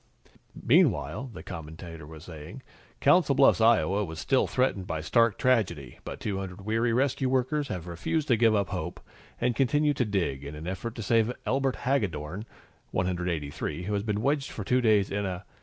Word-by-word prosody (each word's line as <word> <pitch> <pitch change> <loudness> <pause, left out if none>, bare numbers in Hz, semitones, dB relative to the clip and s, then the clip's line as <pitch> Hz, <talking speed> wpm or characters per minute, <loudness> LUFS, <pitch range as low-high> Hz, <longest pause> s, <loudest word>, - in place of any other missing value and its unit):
"Meanwhile," 75 - +2
the - - -9
commentator 80 0 -8
was 80 -1 -11
saying, 85 - -10 0.4
"Council 145 -1 +4
Bluffs, 135 -4 +5
Iowa, 105 -3 +4
was 80 -4 -6
still 130 - +2
threatened 115 -8 0
by 80 - -2
stark 115 +8 +3
tragedy. 90 - 0
But - - -7
200 95 -2 -4
weary 115 +2 +1
rescue 130 +2 +1
workers 135 +3 +1
have 90 -9 -5
refused 90 - -2
to 120 - +6
give 115 -1 +4
up 100 -2 +1
hope, 90 -2 -4 0.4
and 120 0 +1
continue 145 +3 +2
to 130 - 0
dig 85 - -1
in 70 +1 -7
an 75 +2 -8
effort 100 +6 -4
to 115 - -5
save 115 +2 +3
Elbert 135 0 +1
Haggedorn, 105 - -2 0.4
183, 90 -3 -2
who 105 +3 -3
has 100 - +1
been 105 0 -2
wedged 140 0 +1
for 105 - -6
two 125 +5 +2
days 105 -4 +3
in 100 0 -1
a 90 +1 -5
105 Hz, 175 wpm, -28 LUFS, 85-125 Hz, 0.4 s, to